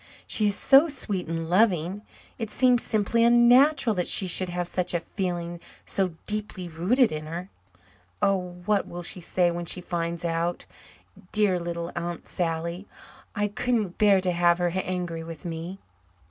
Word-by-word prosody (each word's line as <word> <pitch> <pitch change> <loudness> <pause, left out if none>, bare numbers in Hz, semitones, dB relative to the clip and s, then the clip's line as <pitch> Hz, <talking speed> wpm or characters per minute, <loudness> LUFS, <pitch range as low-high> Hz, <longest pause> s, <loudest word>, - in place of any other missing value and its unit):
She 215 - +1
is 200 - +1
so 275 +8 +6
sweet 215 - -3
and 165 0 -3
loving, 185 0 +2 0.4
it 225 -2 -3
seems 250 -1 +3
simply 220 +2 +1
unnatural 240 +2 +5
that 180 - 0
she 195 - +2
should 185 0 +1
have 175 0 -2
such 180 0 -2
a - - +2
feeling 175 -1 -4 0.3
so 185 -4 0
deeply 210 -4 -3
rooted 205 +10 +2
in 155 0 -5
her. 175 +4 -6 0.7
Oh, 180 -2 -1
what 210 -2 +1
will 175 0 -7
she 180 - -4
say 175 +1 +1
when 170 0 -5
she 180 - -2
finds 170 -1 -3
out 170 +1 -1 0.7
dear 205 -4 +3
little 170 0 -4
Aunt 175 0 -5
Sally? 170 +2 -3 0.5
I 205 0 +1
couldn't 210 -2 -1
bear 205 -2 +5
to 185 -1 0
have 175 0 +3
her 175 0 +1
angry 180 -2 -3
with 165 +1 -9
me." 170 +3 -5
180 Hz, 160 wpm, -26 LUFS, 170-210 Hz, 0.7 s, so